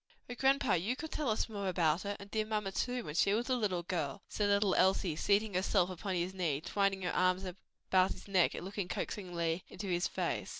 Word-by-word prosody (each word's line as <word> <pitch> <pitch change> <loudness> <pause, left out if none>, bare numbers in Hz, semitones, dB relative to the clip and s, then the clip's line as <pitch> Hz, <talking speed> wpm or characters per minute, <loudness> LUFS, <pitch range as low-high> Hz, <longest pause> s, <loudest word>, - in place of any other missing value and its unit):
"O 245 - -5
grandpa, 270 -1 +3
you 195 +9 +1
could 315 +3 -7
tell 300 -5 -1
us 215 - +1
more 200 -3 -4
about 170 -2 +2
her, 205 0 -3
and 200 0 -11
dear 220 -1 +1
mamma 210 -2 -2
too, 250 +5 -1
when 150 - -6
she 195 +5 +3
was 240 +4 -1
a - - +4
little 195 -7 0
girl!" 170 -3 -3
said 205 -1 0
little 200 -1 +3
Elsie, 185 -3 +3
seating 205 +5 +2
herself 185 0 +2
upon 185 +1 -3
his 175 +2 -1
knee, 165 -7 0
twining 195 +3 0
her 180 - -1
arms 185 +1 +2 0.5
about 185 0 +5
his - - -13
neck, 190 -3 +3
and - - -6
looking 195 -1 -3
coaxingly 175 -2 -2
into 190 +2 -7
his 175 -1 +1
face. - - -2
190 Hz, 220 wpm, -33 LUFS, 180-210 Hz, 0.5 s, about